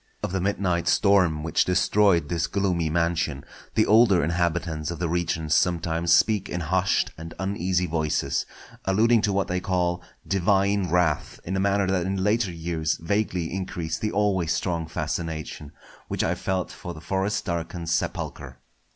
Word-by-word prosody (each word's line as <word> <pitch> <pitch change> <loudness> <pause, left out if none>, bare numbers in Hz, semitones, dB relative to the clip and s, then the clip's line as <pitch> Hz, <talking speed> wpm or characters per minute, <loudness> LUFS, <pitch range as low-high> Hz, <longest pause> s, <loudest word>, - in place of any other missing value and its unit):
Of - - -2
the 95 -1 -1
midnight 90 -3 0
storm 90 -7 +3
which 80 - +2
destroyed 90 0 +3
this 85 -1 -1
gloomy 90 -5 0
mansion, 85 -3 -1 0.3
the 110 - +4
older 105 -5 +5
inhabitants 80 -1 -1
of 85 - -4
the 85 - -1
region 85 -1 -1
sometimes 85 0 +1
speak 105 +2 +3
in 90 - -3
hushed 95 +4 +1
and 80 0 -8
uneasy 95 -1 0
voices; 80 -2 -1 0.4
alluding 110 +4 +4
to 105 - +1
what 100 0 0
they 90 0 -1
call 90 -2 0 0.3
"divine 100 0 +2
wrath" 85 -3 0
in 95 - -3
a - - 0
manner 100 0 +2
that 95 -2 0
in 95 0 -1
later 105 -1 +1
years 80 -2 -2
vaguely 90 -2 -1
increased 90 -4 -4
the 105 - -1
always 95 -5 +1
strong 85 -2 -1
fascination 80 -2 -4 0.4
which - - -1
I - - +1
felt 95 -1 -2
for 90 -1 -8
the - - -9
forest 95 +3 -1
darkened 85 -1 -4
sepulchre. 70 -5 -3
90 Hz, 160 wpm, -25 LUFS, 80-95 Hz, 0.4 s, older